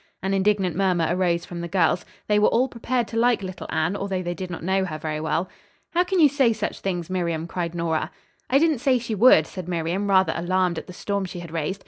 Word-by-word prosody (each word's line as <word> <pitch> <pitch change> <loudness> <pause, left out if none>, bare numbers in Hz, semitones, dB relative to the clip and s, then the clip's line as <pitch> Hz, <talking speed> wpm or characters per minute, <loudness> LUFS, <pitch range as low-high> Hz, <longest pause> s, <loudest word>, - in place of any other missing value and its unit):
An 195 +1 0
indignant 195 -3 +1
murmur 180 -3 +2
arose 175 -1 +1
from 175 -1 -7
the 170 - -4
girls. 180 -1 +1 0.2
They 210 0 +2
were 210 - +5
all 250 +3 +2
prepared 240 -1 -2
to 230 - -4
like 240 -2 +3
little 185 -1 -6
Anne, 160 +4 0
although 195 -2 -2
they 175 0 -2
did 185 0 -6
not 175 -2 -6
know 190 +2 +1
her 160 -5 -4
very 155 0 -3
well. 160 +3 -1 0.4
"How 350 +1 +3
can 370 0 -1
you 310 - +8
say 270 -4 +2
such 215 -1 -4
things, 175 -4 -3
Miriam?" 170 -3 -2
cried 170 0 -4
Nora. 160 -2 -1 0.4
"I 265 - +4
didn't 310 -3 +2
say 260 0 +3
she 235 -2 -4
would," 210 -7 +6
said 185 0 -8
Miriam 175 +3 -1
rather 190 -1 +4
alarmed 180 0 0
at - - -12
the 180 - -9
storm 200 +1 -2
she 180 -1 -7
had 170 -2 -9
raised. 165 +4 -3
185 Hz, 240 wpm, -24 LUFS, 170-210 Hz, 0.4 s, you